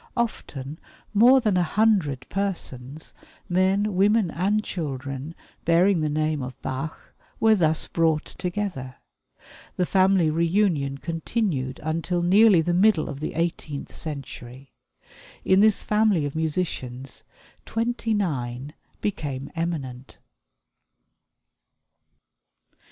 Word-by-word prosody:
Often 150 - -3 0.3
more 245 +6 +7
than 210 -5 +2
a - - +3
hundred 175 - +1
persons 155 -8 -4 0.3
men, 190 +3 +2
women, 200 -1 +3
and 205 +5 0
children 140 -2 -5 0.3
bearing 170 +2 +3
the 155 - 0
name 155 0 0
of 130 0 -7
Bach 135 +4 -5 0.3
were 225 0 +5
thus 160 -6 +2
brought 160 -2 +1
together. 180 -9 -4 0.8
This 180 - +1
family 190 -4 +4
reunion 165 -4 +1
continued 165 - -2
until 165 +3 -1
nearly 195 0 +6
the 175 +2 0
middle 185 -2 +4
of 145 -4 -6
the 155 - -4
eighteenth 160 -3 -3
century. 135 -3 -7 0.7
In 190 +1 +5
this 215 0 +4
family 210 -7 +2
of 145 - -4
musicians, 145 -6 -3 0.4
twenty 230 -1 -1
nine 135 -7 -2 0.3
became 145 -9 -3
eminent. 140 -7 -4
165 Hz, 105 wpm, -25 LUFS, 140-195 Hz, 0.8 s, more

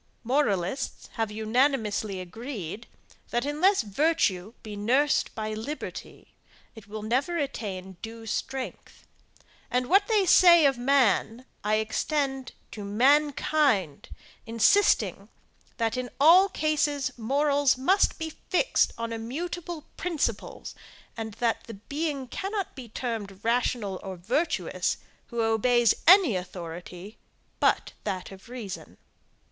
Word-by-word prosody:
Moralists 240 -4 -1
have 225 -2 -1
unanimously 220 -2 0
agreed, 210 - -7 0.4
that 240 +2 -1
unless 310 - +2
virtue 215 - 0
be 210 -1 -7
nursed 260 +8 +1
by 215 -1 -3
liberty, 240 +8 -7 0.4
it 220 -3 -13
will 210 +1 -7
never 265 +10 0
attain 195 - -4
due 225 0 -8
strength 260 +4 -5 0.6
and 250 +1 0
what 395 +8 +4
they 425 -4 +3
say 345 -3 +7
of 275 -1 +4
man 245 -2 +2 0.2
I 210 +1 +2
extend 270 +4 -1 0.2
to 210 - -7
mankind, 265 - +2 0.4
insisting, 230 - +3 0.5
that 230 0 0
in 255 -1 -3
all 350 +7 +7
cases 290 -5 0
morals 280 +3 +2
must 370 +10 +2
be 320 -1 -4 0.2
fixed 370 +6 +2
on 230 0 -4
immutable 320 +8 -5
principles; 335 -4 -3 0.4
and 220 -2 -6
that 230 -1 -1
the 230 - -8
being 280 +5 -4
cannot 390 - -4
be 255 -4 -9
termed 210 -5 -5
rational 230 -4 0
or 190 -1 -6
virtuous, 265 - -1 0.3
who 235 -2 -2
obeys 225 +1 +3
any 355 - +7
authority 180 +2 -7 0.4
but - - +2
that 185 0 -4
of 195 +3 -13
reason. 225 -7 -8
245 Hz, 115 wpm, -27 LUFS, 215-290 Hz, 0.6 s, say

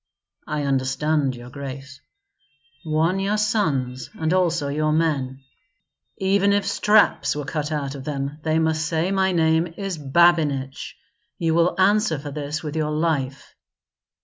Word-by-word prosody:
'" - - -66
"I 150 -1 -2
understand, 135 +1 0
your 120 +1 -11
grace." 135 0 -8 0.8
"Warn 165 +4 +1
your 200 +2 0
sons, 150 - -1
and 160 +1 -1
also 170 -5 +1
your 155 +2 0
men. 140 -5 0 0.7
Even 200 +1 +2
if 200 -1 +1
straps 210 -5 +3
were 145 -1 -4
cut 150 0 -3
out 140 -3 -2
of 140 -2 -8
them, 140 +1 -4
they 155 0 0
must 160 -1 +1
say 165 +4 0
my 190 -1 +2
name 160 0 +2
is 195 -5 -4
Babinich. 145 -3 +2 0.4
You 165 -1 0
will 170 +3 +2
answer 200 -3 +3
for 145 +1 -7
this 150 +1 -4
with 150 0 -5
your 155 -1 0
life." 150 -4 -2
155 Hz, 150 wpm, -23 LUFS, 140-170 Hz, 0.8 s, straps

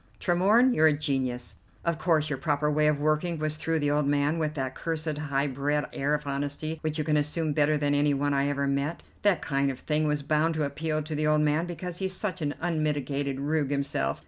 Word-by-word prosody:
Tremorne, 205 +8 +4
you're 160 -6 +5
a 155 - +4
genius. 130 -5 -2 0.3
Of 170 -1 0
course 155 -3 +2
your 145 -4 -3
proper 150 +1 +1
way 150 +1 +3
of 150 -1 +2
working 155 +3 0
was 155 0 -2
through 165 +1 -1
the 145 -1 +1
old 145 -1 +1
man 145 +3 +1
with 155 -1 -1
that 130 -2 -2
cursed 160 -1 -3
high 145 -2 -1
bred 145 +2 -1
air 145 +2 +1
of 150 0 -5
honesty 145 +3 -3
which 155 0 -2
you 155 - 0
can 150 0 +1
assume 150 +1 0
better 150 +1 +3
than 145 -1 +1
any 145 0 +2
one 145 +1 0
I 140 0 +2
ever 140 0 0
met. 140 +4 -1 0.2
That 205 -5 +2
kind 140 0 +1
of 130 - -4
thing 155 +2 0
was 150 -1 0
bound 155 +3 +1
to 155 - 0
appeal 155 +2 -2
to 155 +1 -5
the 150 0 0
old 155 0 +3
man 150 +3 +1
because 175 0 -5
he's 190 -1 0
such 185 -3 -2
an 145 -1 -1
unmitigated 145 -4 -1
rogue 145 0 0
himself. 140 - -1
150 Hz, 225 wpm, -27 LUFS, 145-155 Hz, 0.3 s, you're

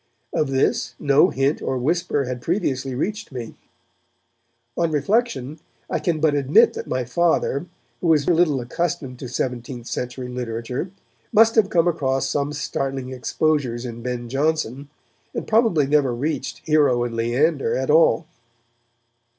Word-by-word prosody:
Of 150 - +1
this 135 0 0
no 145 +5 +4
hint 135 +3 0
or 130 - -1
whisper 145 +2 0
had 125 -1 -5
previously 135 -6 -1
reached 215 - -3
me. 120 -4 -6 1.2
On 170 -1 +1
reflection, 155 - 0 0.3
I - - +1
can 165 -3 0
but 155 -1 +3
admit 140 0 +4
that - - -6
my 130 -1 -1
Father, 165 +2 +1 0.3
who 175 - -2
was 155 -3 +3
little 165 -5 +3
accustomed 135 -1 -3
to 130 - -6
seventeenth 125 -1 -4
century 125 +1 -4
literature, 125 +5 -4 0.4
must 225 0 +5
have 220 -4 +3
come 175 -4 +3
across 135 -6 0
some 145 0 -1
startling 135 -2 -3
exposures 130 -2 -1
in 120 -1 -6
Ben 120 0 -4
Jonson, 140 0 -1 0.5
and - - -3
probably 220 - +3
never 140 -3 +2
reached 150 +6 -3
'Hero 145 -6 +3
and 120 -1 -3
Leander' 130 +6 +1
at 130 +2 0
all. 160 +1 +4
140 Hz, 140 wpm, -22 LUFS, 125-160 Hz, 1.2 s, must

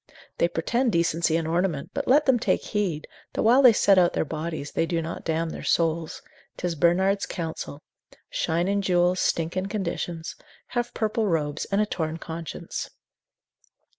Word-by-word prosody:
They - - +4
pretend 235 +9 0
decency 170 -1 +2
and 165 -1 -2
ornament; 170 -3 -1
but 280 0 -3
let 290 +4 +5
them 260 -3 +4
take - - +1
heed, 185 -8 -2 0.3
that - - -1
while 240 +5 +6
they 255 -3 +9
set 200 -3 +4
out 175 -1 +3
their - - 0
bodies 155 -1 -4
they 165 - 0
do 170 -1 0
not 165 0 -5
damn 160 0 -1
their - - -7
souls; 165 -1 0 0.3
'tis 175 -1 -2
Bernard's 185 +5 +2
counsel: 160 -3 -5 0.4
shine 170 +2 0
in 200 +1 +1
jewels, 180 -1 +2
stink 165 +1 0
in 185 +1 -1
conditions; 175 -4 -4 0.3
have 240 -1 -2
purple 220 0 0
robes, 150 -5 -1
and 200 +1 +1
a - - +3
torn 160 -5 -3
conscience. 165 -1 -6
170 Hz, 165 wpm, -25 LUFS, 165-200 Hz, 0.4 s, they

